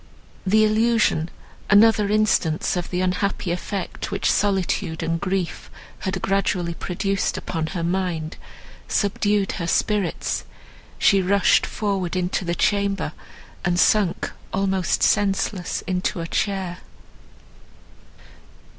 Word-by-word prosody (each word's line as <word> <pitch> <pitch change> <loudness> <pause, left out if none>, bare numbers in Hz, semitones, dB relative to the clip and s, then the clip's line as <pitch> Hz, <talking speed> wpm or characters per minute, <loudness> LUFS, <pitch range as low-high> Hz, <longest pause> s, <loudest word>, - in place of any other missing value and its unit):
The 215 +3 +5
illusion, 215 -6 +2 0.4
another 210 0 +5
instance 205 -8 +2
of 175 -1 -3
the 180 0 -1
unhappy 185 0 -1
effect 180 +1 -4
which - - +1
solitude 190 -5 0
and 165 0 -1
grief 190 -3 -2 0.3
had 190 0 -2
gradually 190 -3 0
produced 195 +3 -1
upon 160 -2 -3
her 170 - -2
mind, 170 -3 -2 0.5
subdued 205 0 +1
her 170 - -4
spirits; 200 0 0 0.5
she 195 -2 +4
rushed 200 +1 +3
forward 195 -4 -2
into 180 +1 -1
the 175 -1 -1
chamber, 200 -5 0 0.5
and 175 0 +1
sunk 200 -4 +2 0.2
almost 190 -1 0
senseless 195 -2 +1
into 180 -1 -1
a 165 - -3
chair. 185 0 -2
190 Hz, 110 wpm, -23 LUFS, 175-200 Hz, 0.5 s, The